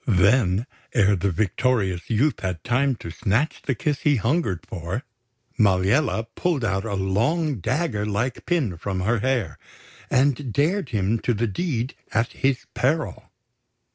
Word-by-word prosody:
Then, 100 0 +3 0.3
ere 100 -3 +4
the 100 +2 0
victorious 95 0 0
youth 130 +7 +2
had 90 -3 -3
time 130 +2 +2
to 85 - -8
snatch 110 - 0
the 135 - -1
kiss 145 +4 -1
he 150 -3 +3
hungered 115 - 0
for, 90 - -4 0.6
Maliella 105 +6 +3
pulled 160 -9 0
out 95 0 0
a 100 -3 -2
long, 115 - 0
dagger 115 - -1
like 110 +4 -2
pin 140 - 0
from 95 +2 -3
her 115 +5 +1
hair, 125 -1 -1 0.5
and 135 -1 +2
dared 155 - +1
him 105 +1 0
to 120 - 0
the 115 +3 0
deed 125 - -2 0.2
at 115 +1 +1
his 135 -1 0
peril. 150 +4 -1
115 Hz, 145 wpm, -24 LUFS, 100-135 Hz, 0.6 s, ere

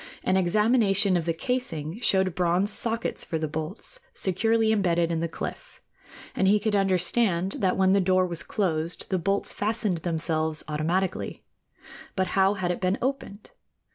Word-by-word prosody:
An 185 - +1
examination 200 +1 +3
of 170 -2 0
the 170 - +1
casing 175 - -3
showed 190 -6 +2
bronze 180 +4 +1
sockets 230 0 0
for 165 - -3
the 155 0 -2
bolts 160 - -4 0.2
securely 225 - +2
embedded 175 -5 +1
in 165 - -1
the 170 - -1
cliff, - - -7 0.6
and 190 - +2
he 210 +2 +4
could 210 0 -1
understand 190 0 +1
that 185 -2 +1
when 190 0 +3
the 195 0 +4
door 185 0 +3
was 170 -3 -5
closed 165 0 -1
the 185 - +1
bolts 195 +4 -1
fastened 210 -4 -1
themselves 160 -2 -1
automatically. 165 +5 -2 0.7
But 190 -1 0
how 195 +1 +2
had 180 -2 -1
it 180 - -4
been 185 +1 +1
opened? 260 - -4
185 Hz, 160 wpm, -26 LUFS, 170-205 Hz, 0.7 s, he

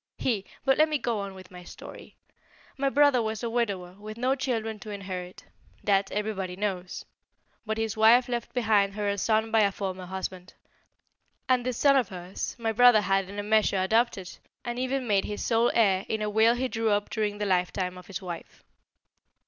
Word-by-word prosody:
He 215 -7 -1 0.2
but 270 0 +3
let 310 0 +5
me 305 - +1
go 235 -5 -2
on 200 -1 -6
with 185 0 -13
my 180 0 -11
story. - - -12 0.6
My 275 0 0
brother 285 -3 +4
was 220 0 -3
a 235 - -2
widower, 200 -7 -1
with 215 +1 -8
no 255 +3 +1
children 225 -5 -2
to 215 - -10
inherit. 185 -3 -7 0.4
That 195 -1 +2
everybody 200 -3 -3
knows. 185 -2 -4 0.6
But 220 0 -1
his 225 -1 -2
wife 230 +3 +5
left 240 -1 -3
behind 210 -5 +2
her 210 -1 -2
a 200 0 -1
son 220 +2 +1
by 225 - +4
a 200 -2 +4
former 190 -2 -5
husband, 185 -1 -6 0.9
and 255 -1 +3
this 250 -1 -2
son 280 -1 +5
of 245 -7 +1
hers 180 0 -6
my 225 -2 -1
brother 245 -1 +6
had 195 -1 0
in 200 - -8
a 205 - -2
measure 215 -1 +2
adopted, 195 -1 0 0.3
and 240 0 -3
even 260 0 -1
made 200 -4 +2
his 205 - -4
sole 230 0 +3
heir 195 -4 +3
in 220 -1 -1
a 210 - -2
will 220 +2 +4
he 260 +1 -1
drew 225 -2 -1
up 205 0 0
during 210 -2 -1
the 210 - -2
lifetime 180 -1 0
of 180 -1 -12
his 195 -1 -6
wife. 175 -2 -8
215 Hz, 195 wpm, -27 LUFS, 195-235 Hz, 0.9 s, brother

